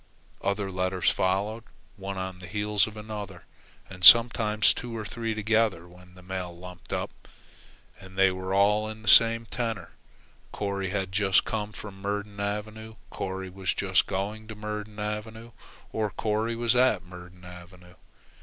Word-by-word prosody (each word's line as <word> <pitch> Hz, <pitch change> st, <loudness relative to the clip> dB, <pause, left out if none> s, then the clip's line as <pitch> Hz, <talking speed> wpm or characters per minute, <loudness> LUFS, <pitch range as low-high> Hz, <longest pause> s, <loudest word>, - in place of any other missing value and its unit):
Other 100 Hz, 0 st, -1 dB
letters 90 Hz, 0 st, +1 dB
followed, 100 Hz, +4 st, -1 dB, 0.3 s
one 95 Hz, -1 st, -6 dB
on 95 Hz, -1 st, -5 dB
the 90 Hz, -, -10 dB
heels 105 Hz, +1 st, +1 dB
of 110 Hz, 0 st, -10 dB
another, 105 Hz, -4 st, -7 dB, 0.4 s
and 95 Hz, -1 st, -11 dB
sometimes 110 Hz, 0 st, +7 dB
two 120 Hz, -2 st, -6 dB
or 110 Hz, -, -5 dB
three 115 Hz, +1 st, -3 dB
together 110 Hz, -5 st, +1 dB
when 90 Hz, +1 st, -17 dB
the 90 Hz, -, -15 dB
mail 90 Hz, -2 st, -5 dB
lumped 90 Hz, 0 st, -12 dB
up. -, -, -2 dB, 0.9 s
And 95 Hz, 0 st, -13 dB
they 95 Hz, 0 st, +5 dB
were 95 Hz, 0 st, -5 dB
all 105 Hz, +2 st, +3 dB
in 110 Hz, 0 st, -9 dB
the -, -, -12 dB
same 115 Hz, +2 st, +7 dB
tenor. 115 Hz, -7 st, -4 dB, 0.6 s
Corry 100 Hz, -2 st, -3 dB
had 95 Hz, -1 st, -2 dB
just 100 Hz, -1 st, +3 dB
come 105 Hz, -1 st, -3 dB
from 100 Hz, -2 st, -10 dB
Myrdon 100 Hz, 0 st, -4 dB
Avenue; 110 Hz, +2 st, -4 dB, 0.2 s
Corry 95 Hz, 0 st, -5 dB
was 95 Hz, -3 st, -2 dB
just -, -, +2 dB
going 105 Hz, +3 st, -3 dB
to 110 Hz, -, -8 dB
Myrdon 105 Hz, 0 st, -6 dB
Avenue; 110 Hz, +2 st, -5 dB, 0.4 s
or 110 Hz, -1 st, -1 dB
Corry 110 Hz, +3 st, -1 dB
was 120 Hz, +1 st, +1 dB
at 130 Hz, +1 st, +3 dB
Myrdon 90 Hz, 0 st, -12 dB
Avenue. 90 Hz, 0 st, -13 dB
100 Hz, 155 wpm, -27 LUFS, 95-110 Hz, 0.9 s, sometimes